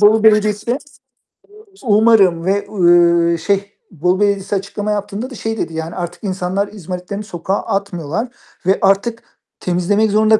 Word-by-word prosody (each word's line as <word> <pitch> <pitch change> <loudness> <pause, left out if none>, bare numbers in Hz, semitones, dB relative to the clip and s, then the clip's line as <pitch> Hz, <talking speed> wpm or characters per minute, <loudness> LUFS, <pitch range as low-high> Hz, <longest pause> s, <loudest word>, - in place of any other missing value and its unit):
Bolu 210 +1 +5
Belediyesi 210 -1 +3
de 245 +4 0 1.1
umarım 205 -6 +4
ve, 200 +1 0
uuu, 170 -3 +4
şey 200 +4 -1 0.2
Bolu 180 +3 0
Belediyesi 200 -1 +1
açıklama 205 +2 -3
yaptığında 205 +4 -3
da 255 - -9
şey 225 +1 -3
dedi, 165 - -3
yani, 160 +1 -5
"Artık 175 +2 -6
insanlar 190 +1 -1
izmaritlerini 190 +1 -6
sokağa 190 0 -3
atmıyorlar 195 - -3 0.4
ve 190 +2 +3
artık 200 +4 +1 0.4
temizlemek 200 +4 +1
zorunda 215 +1 +4
200 Hz, 140 wpm, -17 LUFS, 180-210 Hz, 1.1 s, Bolu